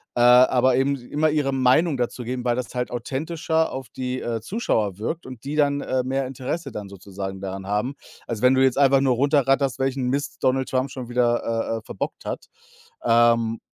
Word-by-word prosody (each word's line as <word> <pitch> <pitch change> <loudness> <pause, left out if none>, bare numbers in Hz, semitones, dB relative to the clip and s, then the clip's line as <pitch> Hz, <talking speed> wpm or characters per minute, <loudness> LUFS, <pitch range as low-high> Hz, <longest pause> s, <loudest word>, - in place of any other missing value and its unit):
äh, 120 - +1
aber 125 +1 +6
eben 140 +1 +2
immer 145 +5 -1
ihre 145 -3 0
Meinung 135 +4 +3
dazu 125 0 -2
geben, 125 +1 -4
weil 120 - +2
das 125 0 -4
halt 125 0 -1
authentischer 160 +6 -1
auf 130 -2 -6
die, 130 0 -4
äh, 115 -1 -2
Zuschauer 110 - -1
wirkt 160 +10 -4
und 130 -3 -10
die 140 +2 -4
dann, 140 -1 +2
äh, 130 -1 -1
mehr 135 +1 -1
Interesse 135 +3 -4
dann 105 -2 -6
sozusagen 95 0 -7
daran 95 0 -6
haben, 105 +7 -1 0.3
als 115 -3 -4
wenn 125 +1 +5
du 130 0 +4
jetzt 130 -1 +2
einfach 135 -1 +5
nur 130 -2 +2
runter 140 +2 +2
ratterst, 135 -1 +2
welchen 135 -1 -1
Mist 140 +1 -2
Donald 130 0 +1
Trump 130 +1 0
schon 125 -2 -7
wieder, 120 -1 +1
äh, 115 0 -1
äh, - - -16
verbockt 95 - -5
hat. - - -5 0.6
Ähm 115 -1 +3
130 Hz, 200 wpm, -23 LUFS, 120-135 Hz, 0.6 s, aber